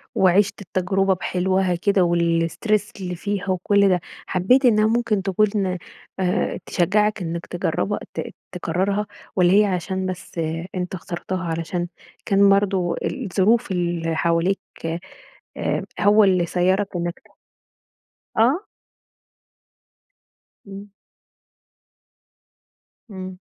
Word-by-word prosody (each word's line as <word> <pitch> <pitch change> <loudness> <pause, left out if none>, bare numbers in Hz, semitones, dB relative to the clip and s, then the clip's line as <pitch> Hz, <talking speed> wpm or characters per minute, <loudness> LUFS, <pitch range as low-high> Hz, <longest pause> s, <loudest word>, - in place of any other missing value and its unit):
وعِشت 190 +2 +3
التجربة 190 +1 +1
بحلوها 185 0 0
كده 190 +2 +2
و 175 0 +2
الstress 170 +5 +1
اللي 180 -1 -3
فيها 200 +1 -3
وكل 200 +2 +3
ده، 180 -1 +3 0.3
حبيت 245 +9 +3
إنها 215 -3 +5
ممكن 230 -3 +1
تكون، 195 -1 +1 0.4
آآ 180 -1 0
تشجعك 210 +4 +1
إنك 170 0 -4
تجربها 160 - -1
ت - - -2 0.3
تكررها 190 +4 -1 0.3
والّا 180 -1 +4
هي 210 +1 +6
عشان 190 0 -2
بس 185 -2 -6 0.4
أنتَ 180 0 -3
اخترتها 185 +2 -5
علشان 170 +1 -2 0.4
كان 200 0 +5
برضو 195 -3 +2
الظروف 220 -3 +1
اللي 170 -2 -1
حواليك، 170 +4 +1 1.0
آآ - - -1 0.2
هو 205 +1 +6
اللي 185 -3 +3
سيَّرك 185 +3 +1
إنك 175 0 -2
ت - - -31 1.2
آه. 270 - +3 2.0
امم. 200 +1 -9 2.2
امم. 185 -2 -7
185 Hz, 105 wpm, -22 LUFS, 175-200 Hz, 2.2 s, هي